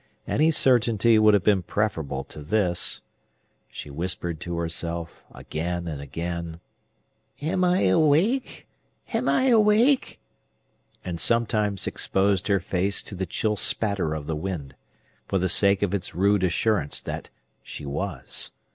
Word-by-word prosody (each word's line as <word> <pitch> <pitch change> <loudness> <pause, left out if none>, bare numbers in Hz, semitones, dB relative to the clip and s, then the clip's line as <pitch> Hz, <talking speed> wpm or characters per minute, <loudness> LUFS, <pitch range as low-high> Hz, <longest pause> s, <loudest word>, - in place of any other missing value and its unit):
Any 155 +2 +3
certainty 115 -6 +4
would 110 -1 +6
have 100 - +1
been 100 -3 +3
preferable 80 -8 -2
to 75 - -11
this. 90 +2 0 0.7
She 75 - -9
whispered 85 +1 -3
to 85 +1 -5
herself, 85 0 -4
again 85 +2 -4
and 75 -4 -5
again, 85 +3 -5 0.8
"Am 185 +5 -1
I 180 +1 +3
awake?—Am 160 - 0
I 260 0 +3
awake?" 230 +4 +3 0.9
and 85 -2 -4
sometimes 105 -3 +1
exposed 95 0 0
her 100 -2 +3
face 95 +3 -1
to - - -8
the 95 -1 -3
chill 105 +5 -1
spatter 100 -6 0
of 75 -2 -6
the 80 +1 -2
wind, 75 -5 -5 0.5
for 95 - 0
the 95 0 +1
sake 100 +2 +3
of 100 -2 0
its 100 -5 -3
rude 100 +1 +2
assurance 90 -2 0
that - - -6 0.3
she 75 - -9
was. 70 0 -2
95 Hz, 135 wpm, -25 LUFS, 85-110 Hz, 0.9 s, would